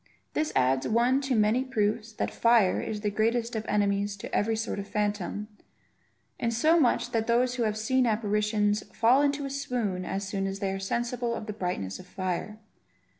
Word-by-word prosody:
This 305 0 0
adds 130 +1 +2
one 240 +4 +3
to 270 -2 0
the - - +3
many 215 +5 +3
proofs 220 -3 -1
that - - -3
fire 230 -5 +3
is 210 -1 -4
the 210 -1 -1
greatest 230 +3 0
of 220 0 -3
enemies 200 0 +1
to - - -6
every 225 +2 +1
sort 220 -2 -3
of 200 - -6
phantom; 210 -1 -2 0.9
in 235 - 0
so 310 +9 +3
much 250 -6 +2
that 225 -1 0
those 245 +2 +2
who 250 -2 -1
have 215 0 -1
seen 250 +3 +2
apparitions, 210 -1 +1
fall 240 +5 +5
into 285 0 +1
a - - -3
swoon 240 -9 -2
as 195 +2 -3
soon 195 -1 -2
as 195 0 -3
they 195 -1 -2
are 195 - -3
sensible 235 +4 -2
of 215 - -6
the 210 - -5
brightness 180 - -3
of 185 - -12
fire. 185 +3 -3
215 Hz, 195 wpm, -28 LUFS, 200-240 Hz, 0.9 s, fall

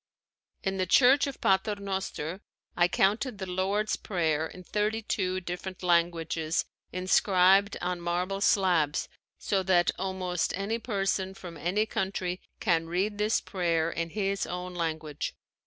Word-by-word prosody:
In 195 0 -1
the 185 -1 0
Church 265 +8 +6
of 275 - -6
Pater 195 +2 +2
Noster 190 -3 -4 0.3
I 175 0 +4
counted 210 +6 +1
the 190 - -4
Lord's 195 +4 0
Prayer 160 -5 0
in 180 +3 -12
thirty 215 +4 -1
two 185 -3 -1
different 180 +1 -6
languages 170 -2 +1 0.3
inscribed 190 +2 +4
on 180 0 -2
marble 180 +3 -1
slabs 175 -8 +2 0.3
so 195 -2 0
that 180 -2 +3
almost 185 -2 -1
any 210 +4 -2
person 195 -3 -1
from 175 -3 -9
any 180 +7 0
country 190 -3 -2 0.2
can 165 -5 +1
read 195 +5 -1
this 210 +1 +2
prayer 170 -4 0
in 165 0 -3
his 195 +1 -1
own 180 +1 -5
language. 160 -3 -3
185 Hz, 140 wpm, -29 LUFS, 175-200 Hz, 0.3 s, Church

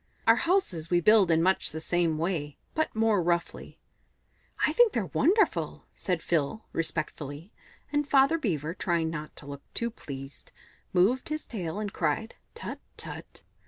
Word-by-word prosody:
Our - - +7
houses 260 - +1
we 175 - +4
build 210 0 +5
in 165 0 +4
much 190 +1 +2
the 160 - -5
same 165 -1 +1
way, 155 -4 -2 0.2
but 315 -6 -1
more 220 -3 +3
roughly." 170 0 -2 0.9
"I - - +1
think 480 -3 +5
they're - - 0
wonderful," 415 +5 +1
said 180 -3 -2
Phil 170 +6 0
respectfully, 155 +1 -3 0.4
and 290 -1 +1
Father 275 +4 +5
Beaver, 165 - -1
trying 170 -4 0
not 155 -1 -6
to - - -9
look 140 0 -7
too 235 0 -1
pleased, 135 -7 -9 0.4
moved 205 +11 +2
his 305 0 -3
flat - - -22
tail 180 -1 -3
and 205 -2 -4
cried 170 +8 -1 0.2
"Tut, - - -6 0.2
tut!" - - -8
175 Hz, 160 wpm, -28 LUFS, 160-225 Hz, 0.9 s, Our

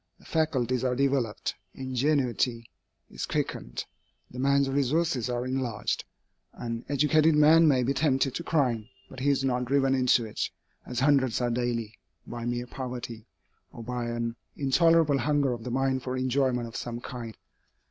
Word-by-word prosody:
The - - -21
faculties 130 -6 0
are 125 -1 +1
developed, 135 -5 0 0.2
ingenuity 130 -3 0 0.4
is - - -4
quickened, - - -3 0.5
the 125 - -8
man's 140 +1 +3
resources 135 -1 +1
are 120 0 -2
enlarged. 130 -4 -2 0.5
An 115 0 -5
educated 150 +2 +4
man 160 +2 +6
may 130 -4 +4
be 135 +3 +1
tempted 135 -2 +1
to 170 - -4
crime, 125 -9 0 0.2
but 130 - -9
he 140 +2 +1
is 140 -1 +2
not 125 -1 0
driven 135 +1 +2
into 125 -2 +3
it, 110 - -3 0.4
as 125 0 -3
hundreds 135 -4 +3
are 120 -1 0
daily, 115 -3 -2 0.3
by 120 0 -6
mere 120 0 -2
poverty, 125 -3 -6 0.4
or 115 - -9
by 125 +1 -3
an 120 0 -3 0.2
intolerable 150 +1 +3
hunger 140 0 +1
of 115 -2 -7
the 125 - -5
mind 130 +1 0
for 130 0 -3
enjoyment 130 -2 +1
of 115 - -11
some 120 0 -4
kind. 120 -3 -7
130 Hz, 160 wpm, -28 LUFS, 120-140 Hz, 0.5 s, man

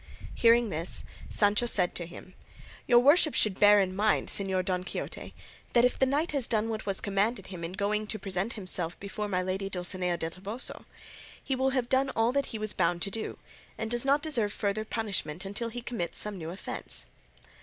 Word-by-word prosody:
Hearing 235 -1 +4
this, 165 0 +2 0.3
Sancho 210 +3 +2
said 180 -6 +3
to 170 - -4
him, 185 +2 -12 0.5
"Your 240 - +6
worship 290 +5 +5
should 200 -3 +1
bear 205 0 +7
in 185 -1 0
mind, 210 +2 +1
Señor 190 -2 +1
Don 180 -1 -1
Quixote, - - -6 0.4
that 240 0 +5
if 250 - 0
the 265 - +4
knight 295 +6 0
has 275 -5 +1
done 225 -1 0
what 220 -1 -4
was 195 -1 +1
commanded 200 +1 0
him 180 -3 -8
in 165 +2 -4
going 210 +2 -1
to 215 - -1
present 195 +2 -3
himself 180 -4 -4
before 205 +1 -4
my 185 -2 0
lady 190 +1 -2
Dulcinea 180 -1 -1
del 165 0 -4
Toboso, 200 +8 -5 0.6
he 270 - -1
will 265 +1 +1
have 255 -2 0
done 265 +2 +2
all 225 +1 +3
that 280 +1 0
he 225 - -5
was 215 -1 -3
bound 175 -1 +1
to 200 - -3
do, 220 +2 -4 0.4
and 220 0 -4
does 240 0 +1
not 280 +3 +2
deserve 240 -10 +1
further 210 +1 -2
punishment 195 -7 -3
unless 225 +4 -4
he 245 -1 -6
commits 200 -9 -1
some 210 -1 +2
new 165 -3 -6
offence." 185 +4 0
210 Hz, 200 wpm, -29 LUFS, 185-235 Hz, 0.6 s, bear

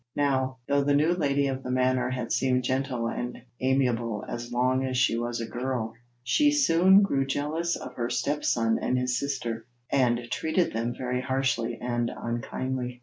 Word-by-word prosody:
Now, 130 -2 +1
though 140 0 +2
the 145 0 +2
new 155 +4 +3
lady 140 -5 +1
of 135 -1 -2
the 125 - -6
manor 130 0 +1
had 125 -2 -3
seemed 125 -1 +2
gentle 130 -2 -1
and 120 +1 -4 0.2
amiable 120 -4 0
as 120 0 -5
long 130 +2 +1
as 130 -1 -1
she 125 -2 +3
was 120 0 -2
a 115 - -2
girl, 120 -2 -3 0.3
she 290 - +3
soon 190 - +5
grew 140 -9 +1
jealous 150 +5 -1
of - - -8
her 120 -1 -2
stepson 115 -7 +1
and 125 - +1
his 125 -1 0
sister, 120 -5 -3 0.2
and 125 -3 +3
treated 160 +3 0
them 115 +2 -2
very 125 0 -2
harshly 130 -3 0
and 120 -1 -1
unkindly. 125 +1 -4
130 Hz, 170 wpm, -27 LUFS, 120-140 Hz, 0.3 s, soon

